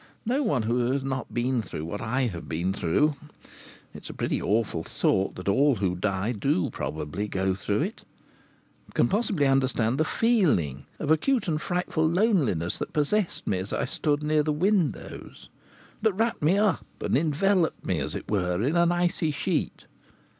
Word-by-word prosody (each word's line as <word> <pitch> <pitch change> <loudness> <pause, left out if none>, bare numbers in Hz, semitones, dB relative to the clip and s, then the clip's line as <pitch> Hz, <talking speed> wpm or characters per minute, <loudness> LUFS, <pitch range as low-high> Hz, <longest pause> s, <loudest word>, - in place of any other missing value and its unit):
No 255 +6 +1
one 145 - +1
who 120 +2 +1
has 135 0 -1
not 130 -2 -3
been 120 0 0
through 80 -6 -6
what 105 +5 -5
I 125 +4 0
have 95 -9 -4
been 85 +4 -1
through 140 - +2 0.8
it - - -11
is - - -6
a - - -8
pretty - - -1
awful 100 -5 0
thought 95 +3 0
that 90 - -8
all 135 +7 +4
who 95 -4 -1
die 100 +3 -1
do 110 -4 0
probably 75 +8 -4
go 95 -1 0
through 100 +4 -1
it 210 +7 -5 0.9
can - - +4
possibly 200 -7 +1
understand 130 -2 +2
the - - +4
feeling 155 - +1
of 155 -1 -1
acute 225 - +2
and 155 -2 0
frightful 175 -3 0
loneliness 165 - +1
that - - -5
possessed 170 +6 0
me 95 - 0
as 95 +2 -5
I - - 0
stood 145 +3 -1
near 150 0 +2
the 150 +1 0
windows, 180 +2 -1 0.5
that 220 -2 +2
wrapped 225 +4 0
me 165 +6 +3
up 205 -3 +2 0.2
and - - 0
enveloped 165 +5 +1
me, - - 0
as - - -3
it - - -5
were, 90 -4 0
in 145 +7 +1
an 170 0 +4
icy 175 -2 +1
sheet. 145 - -2
140 Hz, 175 wpm, -26 LUFS, -, 0.9 s, all